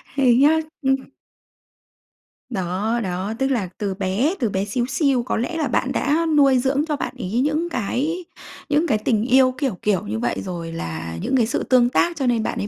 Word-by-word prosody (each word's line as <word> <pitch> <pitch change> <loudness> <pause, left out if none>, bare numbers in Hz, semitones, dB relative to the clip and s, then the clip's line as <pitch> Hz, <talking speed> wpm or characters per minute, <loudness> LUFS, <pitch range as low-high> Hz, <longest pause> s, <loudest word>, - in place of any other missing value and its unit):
Thế 260 -4 +4
nhá, 300 +5 +5 0.2
ừm. 270 0 +3 1.5
Đó, 200 +3 -1
đó, 190 +3 -3
tức 265 - +2
là 205 -8 -1
từ 200 -2 -2
bé, 200 - 0
từ 230 -4 +1
bé 195 +1 -1
xíu 240 +4 -1
xiu, 265 -2 +1
có 245 - -2
lẽ 325 +9 -2
là 300 -4 0
bạn 255 +2 0
đã 305 +4 +1
nuôi 275 -3 +5
dưỡng 275 +4 +1
cho 300 - 0
bạn - - -4
ấy 220 +7 -1
những 305 +4 0
cái 300 - -2 0.4
những 305 +3 +2
cái 215 - +2
tình 215 0 0
yêu, 260 0 +5
kiểu, 265 -11 -1
kiểu, 205 -4 +1
như 110 +2 -3
vậy 120 +1 -1
rồi 170 -3 -5
là 80 - -5
những - - 0
cái 230 - +3
sự 235 - -2
tương 245 -2 +4
tác, 340 +6 +1
cho 270 - -1
nên 230 -2 +2
bạn - - -3
ấy 205 - -2
245 Hz, 210 wpm, -22 LUFS, 200-275 Hz, 1.5 s, nhá